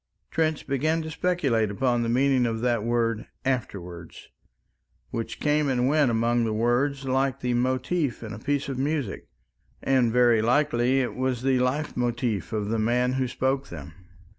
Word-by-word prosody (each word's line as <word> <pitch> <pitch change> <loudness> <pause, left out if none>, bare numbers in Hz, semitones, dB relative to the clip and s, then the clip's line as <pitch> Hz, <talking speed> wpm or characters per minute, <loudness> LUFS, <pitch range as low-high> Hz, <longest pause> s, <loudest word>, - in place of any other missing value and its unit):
Trench 160 -2 0
began 155 +4 0
to 160 - -6
speculate 145 - +1
upon 120 +3 0
the 115 - -1
meaning 130 0 +3
of 115 -1 -3
that 120 -3 +1
word 115 -1 0 0.2
"afterwards," 90 -10 -4 0.8
which 115 - -4
came 150 -1 +1
and 125 -1 +1
went 145 -1 +3
among 115 +1 +1
the 110 -1 -1
words 130 +5 +1
like 135 0 0
the 125 -1 0
motif 130 +3 0
in 110 -1 -6
a 105 - -7
piece 140 +3 -1
of 135 -2 -4
music 140 -6 -2 0.6
and 130 -3 +3
very 120 -2 +4
likely 125 +1 +2
was 130 0 -2
the 130 -1 +2
life 135 +5 -1
motif 120 - -1
of 105 -2 -2
the 115 0 0
man 125 +3 +1
who 130 -1 0
spoke 135 +2 -1
them. 80 -2 -9
125 Hz, 165 wpm, -26 LUFS, 115-135 Hz, 0.8 s, very